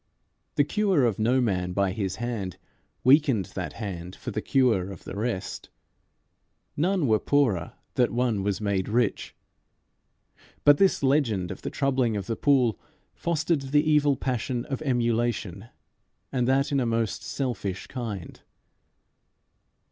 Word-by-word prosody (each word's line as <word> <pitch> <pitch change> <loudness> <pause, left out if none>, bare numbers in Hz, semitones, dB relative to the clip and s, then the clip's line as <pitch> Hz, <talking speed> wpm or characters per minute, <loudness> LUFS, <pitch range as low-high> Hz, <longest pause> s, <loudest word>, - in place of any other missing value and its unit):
The 145 - +4
cure 190 - +2
of 110 -4 0
no 120 +4 +3
man 90 -7 0
by 100 0 +1
his 95 -2 -2
hand 110 -7 -4 0.5
weakened 130 - +4
that 85 -6 -4
hand 90 -4 -6
for - - -6
the - - -2
cure 115 -9 +2
of 95 - -10
the - - -7
rest. 105 -2 -3 1.1
None 180 +1 +1
were 110 -4 +3
poorer 120 - +1 0.2
that 125 - +2
one 120 -4 0
was 100 -1 -1
made 100 -3 -1
rich. 120 +2 0 1.3
But 145 0 +7
this 195 -6 +3
legend 120 -10 +1
of - - -8
the - - -4
troubling 130 -6 0
of 100 - -4
the 115 - -2
pool 125 -5 +2 0.3
fostered 165 -2 0
the 145 +3 +1
evil 150 -2 +4
passion 125 -1 -2
of 135 +2 -4
emulation, 120 - -1 0.6
and 125 -2 0
that 135 +3 +2
in 140 - +2
a 125 - +1
most 115 -2 -1
selfish 105 -8 -3
kind. 110 -8 -6
120 Hz, 140 wpm, -26 LUFS, 100-140 Hz, 1.3 s, But